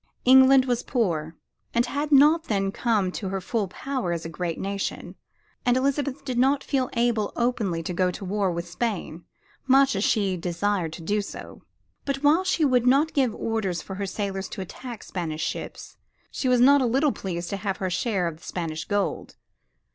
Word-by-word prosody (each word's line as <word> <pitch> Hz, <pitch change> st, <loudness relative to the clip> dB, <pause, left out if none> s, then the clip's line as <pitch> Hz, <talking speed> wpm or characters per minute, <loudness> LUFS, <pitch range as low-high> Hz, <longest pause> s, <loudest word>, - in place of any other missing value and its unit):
England 265 Hz, +1 st, +7 dB
was 245 Hz, -2 st, 0 dB
poor, 165 Hz, -, -1 dB, 0.4 s
and 235 Hz, +1 st, +3 dB
had 285 Hz, +4 st, -3 dB
not 300 Hz, +4 st, +6 dB
then 195 Hz, -2 st, 0 dB
come 210 Hz, -5 st, 0 dB
to 190 Hz, 0 st, -4 dB
her 195 Hz, 0 st, -2 dB
full 205 Hz, +2 st, -2 dB
power 250 Hz, 0 st, -3 dB
as 170 Hz, -1 st, -3 dB
a -, -, -4 dB
great 165 Hz, 0 st, -3 dB
nation, 195 Hz, 0 st, -4 dB, 0.5 s
and 245 Hz, 0 st, +3 dB
Elizabeth 280 Hz, +1 st, -1 dB
did 250 Hz, -3 st, -1 dB
not 270 Hz, +2 st, +3 dB
feel 265 Hz, -3 st, 0 dB
able 235 Hz, -3 st, +1 dB
openly 220 Hz, -9 st, -1 dB
to 180 Hz, -, -4 dB
go 180 Hz, +1 st, +2 dB
to 195 Hz, -, -6 dB
war 195 Hz, 0 st, 0 dB
with 170 Hz, 0 st, -4 dB
Spain, 180 Hz, -4 st, -4 dB, 0.4 s
much 270 Hz, 0 st, +5 dB
as 195 Hz, -, 0 dB
she 200 Hz, -5 st, +1 dB
desired 175 Hz, 0 st, -1 dB
to 165 Hz, -, -9 dB
do 205 Hz, +5 st, 0 dB
so. 200 Hz, -, -9 dB, 0.4 s
But 275 Hz, 0 st, -3 dB
while 310 Hz, +5 st, +4 dB
she 340 Hz, -4 st, +1 dB
would 250 Hz, -3 st, +2 dB
not 285 Hz, +5 st, +4 dB
give 260 Hz, -6 st, +1 dB
orders 215 Hz, -6 st, -2 dB
for 190 Hz, -, -7 dB
her 200 Hz, 0 st, -3 dB
sailors 195 Hz, -1 st, -3 dB
to -, -, -6 dB
attack 235 Hz, +5 st, -8 dB
Spanish 160 Hz, -4 st, -4 dB
ships, -, -, -6 dB, 0.3 s
she 260 Hz, -, -1 dB
was 250 Hz, -1 st, +4 dB
not 280 Hz, +2 st, +6 dB
a 250 Hz, -, +2 dB
little 270 Hz, +5 st, +2 dB
pleased 175 Hz, -5 st, -5 dB
to 200 Hz, -, -2 dB
have 195 Hz, -1 st, -3 dB
her 185 Hz, -1 st, -2 dB
share 185 Hz, -1 st, 0 dB
of 160 Hz, -2 st, -5 dB
the 165 Hz, -, -22 dB
Spanish 160 Hz, -3 st, -4 dB
gold. 205 Hz, -1 st, -2 dB
210 Hz, 195 wpm, -25 LUFS, 185-260 Hz, 0.5 s, England